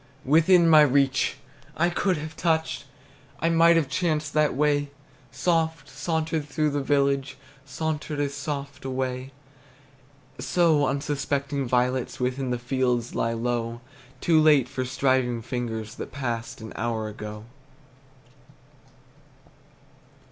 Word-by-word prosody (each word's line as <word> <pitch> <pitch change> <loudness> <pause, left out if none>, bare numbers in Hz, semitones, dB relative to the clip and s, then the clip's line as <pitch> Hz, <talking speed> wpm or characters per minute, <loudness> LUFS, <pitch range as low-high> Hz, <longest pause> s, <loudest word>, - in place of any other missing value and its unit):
Within 165 +5 +5
my 155 -2 +8
reach! 135 -2 +2 0.4
I 170 +2 +2
could 185 0 +1
have 155 +2 -7
touched! 160 -2 0 0.5
I 165 - +1
might 165 0 +5
have 165 -4 +2
chanced 155 +1 -1
that 155 -3 +2
way! 145 0 +1 0.4
Soft 160 +3 0
sauntered 160 +1 -2
through 150 +2 0
the 145 0 -1
village, 140 -1 +1 0.3
Sauntered 150 +2 -3
as 140 -1 -1
soft 140 -1 -5
away! 130 0 -3 1.1
So 160 -5 +3
unsuspected 140 -1 -2
violets 125 +1 0
Within 130 +1 -1
the 125 - 0
fields 125 -1 -1
lie 115 - 0
low, 115 0 -2 0.4
Too 160 -2 +4
late 150 -5 +5
for 130 0 -3
striving 125 -2 +1
fingers 115 -3 -4
That - - -7
passed, 120 -5 -4
an 110 - -8
hour 110 -1 -2
ago. 105 0 -7
140 Hz, 120 wpm, -25 LUFS, 125-155 Hz, 1.1 s, my